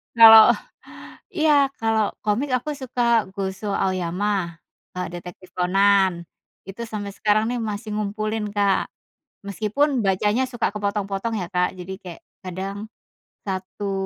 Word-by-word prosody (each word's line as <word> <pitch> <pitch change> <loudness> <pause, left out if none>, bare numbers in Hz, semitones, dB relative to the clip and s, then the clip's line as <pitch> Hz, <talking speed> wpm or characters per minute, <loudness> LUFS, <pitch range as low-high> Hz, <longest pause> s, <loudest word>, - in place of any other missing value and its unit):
Kalau 225 -1 +10 0.8
iya, 300 -5 +3
kalau 220 -2 +1
komik, 230 +8 0
aku 255 +4 -1
suka 240 -4 +1
Gosho, 195 +1 -4
Aoyama, 185 -1 -1 0.4
e - - -4
Detektif 180 +1 -10
Conan, 190 -1 +3 0.4
itu 195 +4 -8
sampai 205 -2 -5
sekarang 215 +1 +2
nih, 245 - -2
masih 215 0 -4
ngumpulin 215 +1 -2
Kak. 200 -1 +1 0.6
Meskipun, 225 +6 0
bacanya 210 +6 +1
suka 240 -2 -1
kepotong-potong 205 +1 -2
ya, 180 - -4
Kak, 180 -1 0
jadi 185 +2 -6
kayak, 175 -3 -10 0.2
kadang, 190 +2 -5 0.7
satu 195 +1 -4
205 Hz, 120 wpm, -23 LUFS, 190-225 Hz, 0.8 s, Kalau